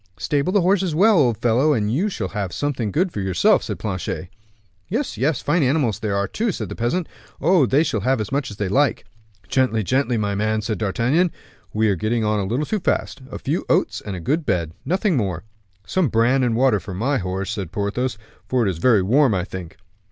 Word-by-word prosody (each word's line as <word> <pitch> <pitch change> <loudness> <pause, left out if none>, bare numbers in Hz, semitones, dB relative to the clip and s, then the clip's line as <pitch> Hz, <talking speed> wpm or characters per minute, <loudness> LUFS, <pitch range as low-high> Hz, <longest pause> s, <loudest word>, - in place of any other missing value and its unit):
"Stable 140 - 0
the 200 0 +3
horses 185 -2 +2
well, 205 +2 +5
old 120 -6 +3
fellow, 125 +6 +3
and 110 -3 0
you 185 +11 +1
shall 100 - -4
have 100 -3 -3
something 130 -6 -2
good 180 - +1
for 105 - -4
yourself," 95 -3 +3
said - - -5
Planchet. 95 -3 -4 0.6
"Yes, 245 - -2
yes; 140 +1 0
fine 155 +4 +2
animals 130 -6 +1
they 110 - -3
are 100 0 0
too," 225 - -1
said - - -5
the - - -6
peasant. 125 +9 -1 0.3
"Oh! 165 -3 +4
they 140 +6 +3
shall 110 - -1
have 130 +5 +1
as 105 - -4
much 140 -2 -1
as 105 - -9
they 100 - -1
like." 135 +6 +1 0.4
"Gently, 115 -1 +1
gently, 130 +3 +1
my 105 -2 -1
man," 110 +1 0
said 110 0 -2
D'Artagnan, 125 - +1 0.4
"we 110 +1 +1
are 100 - +2
getting 110 +5 -1
on 105 0 +1
a 100 - -1
little 125 +10 -1
too 215 - -1
fast. 140 -5 -1
A - - -6
few - - -2
oats - - +1
and 100 - -5
a - - -5
good 150 - 0
bed 90 - -1
nothing 190 0 +1
more." 95 - -1 0.4
"Some 185 - +1
bran 120 +4 +3
and 120 -3 +1
water 125 -3 +3
for 95 -2 -8
my 130 +8 0
horse," 95 +1 -3
said 95 -6 -4
Porthos, 105 +5 -2 0.3
"for 125 -3 +1
it 95 - +2
is 85 - -7
very 110 -1 +4
warm, 125 +3 +3
I 90 - 0
think." 90 -3 -8
115 Hz, 220 wpm, -22 LUFS, 100-145 Hz, 0.6 s, well